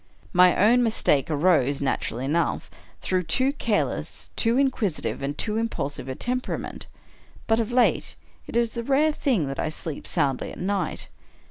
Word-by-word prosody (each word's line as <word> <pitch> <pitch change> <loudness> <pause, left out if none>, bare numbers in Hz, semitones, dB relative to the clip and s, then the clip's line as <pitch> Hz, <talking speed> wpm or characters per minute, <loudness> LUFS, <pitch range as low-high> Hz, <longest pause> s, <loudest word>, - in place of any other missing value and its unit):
My 180 0 +6
own 235 +5 +5
mistake 215 - +2
arose, 150 -3 +2
naturally 130 -2 -2
enough, 165 +5 -1 0.3
through 185 -1 0
too 255 +11 +1
careless, 230 -7 -2
too 230 +1 +2
inquisitive, 255 - 0
and 140 +1 -3
too 215 -1 -1
impulsive 145 - -3
a 130 - -3
temperament. 250 - -3 0.6
But 225 0 +2
of 225 0 -1
late, 245 0 +2 0.3
it - - -2
is 235 -1 +1
a 235 - -2
rare 280 +5 +3
thing 250 - 0
that 135 - -5
I - - 0
sleep 155 -1 -6
soundly 140 -6 0
at - - -10
night. 195 +2 -2
200 Hz, 155 wpm, -25 LUFS, 150-235 Hz, 0.6 s, My